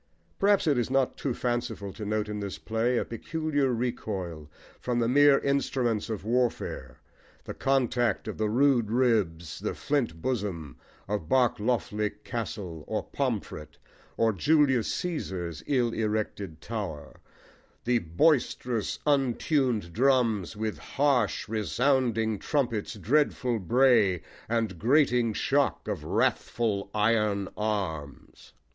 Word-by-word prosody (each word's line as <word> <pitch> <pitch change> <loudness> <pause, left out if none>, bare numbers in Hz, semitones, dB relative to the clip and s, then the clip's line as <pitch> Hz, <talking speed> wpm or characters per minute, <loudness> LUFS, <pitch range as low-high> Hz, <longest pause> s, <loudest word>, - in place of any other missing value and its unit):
Perhaps 200 -1 +3
it 145 -5 +3
is 120 - -1
not 135 -1 +1
too 140 - -2
fanciful 120 -5 -3
to 110 - -8
note 105 +1 -1
in 105 0 -4
this 100 -2 -5
play 115 +3 0
a - - 0
peculiar 150 +1 -1
recoil 100 -10 -3 0.3
from 125 -1 -2
the 115 -1 +2
mere 145 +2 +6
instruments 130 -6 0
of 105 -2 -4
warfare, 115 - -1 0.5
the - - -6
contact 125 -4 +1
of - - -5
the 110 -1 +1
"rude 125 -2 +3
ribs," 105 -10 +1
the - - -3
"flint 135 - -1
bosom," 90 - -3 0.3
of 100 -5 -3
Barkloughly 120 -3 0
Castle 105 -9 -5
or - - -2
Pomfret 75 - -4 0.4
or 115 -1 +3
Julius 140 0 +3
Caesar's 90 - -4
ill 125 -5 +1
erected 105 -6 -2
tower: 100 -10 -6 0.6
the 120 0 +2
Boisterous 120 - +1
untun'd 130 - +1
drums 115 -5 +2
With 110 0 -3
harsh 135 -7 +1
resounding 115 0 +1
trumpets' 120 -10 -1
dreadful 125 +1 +1
bray 105 - +3 0.3
And 110 -6 -1
grating 125 - +3
shock - - 0
of - - -3
wrathful 105 -4 0
iron 105 -2 +1
arms. 95 -10 -4
115 Hz, 120 wpm, -28 LUFS, 100-130 Hz, 0.6 s, mere